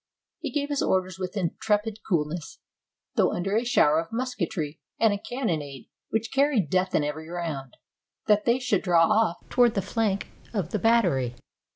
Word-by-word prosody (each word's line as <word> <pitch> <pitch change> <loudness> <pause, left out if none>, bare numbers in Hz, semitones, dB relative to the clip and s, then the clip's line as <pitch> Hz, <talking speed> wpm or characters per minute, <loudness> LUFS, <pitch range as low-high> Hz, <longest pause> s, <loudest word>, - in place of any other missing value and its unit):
He - - -3
gave 290 -1 -1
his 285 -1 0
orders 185 -1 0
with 185 +2 -4
intrepid 210 +4 0
coolness 165 -2 -1 0.3
— - - -60
though - - +3
under 195 +3 -1
a 225 - +2
shower 160 -10 +4
of 165 - -5
musketry 225 - -3 0.2
and 225 -2 +4
a 200 - -3
cannonade 160 - -4 0.2
which 220 0 -1
carried 270 - +2
death 185 0 +1
in - - +3
every 155 +2 -4
round 160 -7 -5 0.2
— - - -63
that 210 -1 +4
they 235 +1 +4
should 245 -6 0
draw 175 -3 +4
off 215 -3 +1
toward 240 -2 +4
the 195 - +1
flank 205 -1 -1 0.3
of 180 -5 -1
the 210 - 0
battery. 175 - +2
195 Hz, 180 wpm, -26 LUFS, 165-225 Hz, 0.3 s, shower